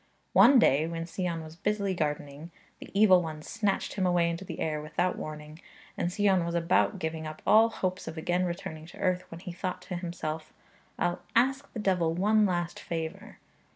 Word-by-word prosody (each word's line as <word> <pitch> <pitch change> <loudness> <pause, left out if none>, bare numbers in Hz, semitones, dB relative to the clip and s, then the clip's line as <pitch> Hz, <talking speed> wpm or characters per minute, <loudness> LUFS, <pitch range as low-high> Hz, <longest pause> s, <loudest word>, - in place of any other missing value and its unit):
One 275 - +8
day 155 - +4
when 165 0 -4
Sion 170 -1 -3
was 160 0 -11
busily 200 +1 -1
gardening, 150 -1 -3 0.3
the - - -10
evil 190 -4 +7
one 155 -2 -6
snatched 210 0 -1
him 190 -2 0
away 175 -1 +2
into 170 +3 -5
the - - -7
air 155 -1 -1
without 175 +4 -1
warning, 155 +1 -8 0.3
and 175 - -1
Sion 195 -2 +3
was 170 0 -3
about 170 +4 +2
giving 160 -2 -4
up 155 0 -9
all 225 +2 +6
hopes 185 -4 -3
of 160 - -6
again 175 +3 0
returning 160 -3 -5
to - - -13
earth, 185 0 0
when 165 0 -9
he 180 - -6
thought 180 +1 -4
to 180 - -5
himself, 170 -3 -5 0.5
'I'll 175 - -1
ask 265 +4 +2
the 225 - -5
devil 180 -5 +1
one 210 +3 +3
last 175 -2 -2
favour.' 160 -1 -5
175 Hz, 190 wpm, -29 LUFS, 160-190 Hz, 0.5 s, One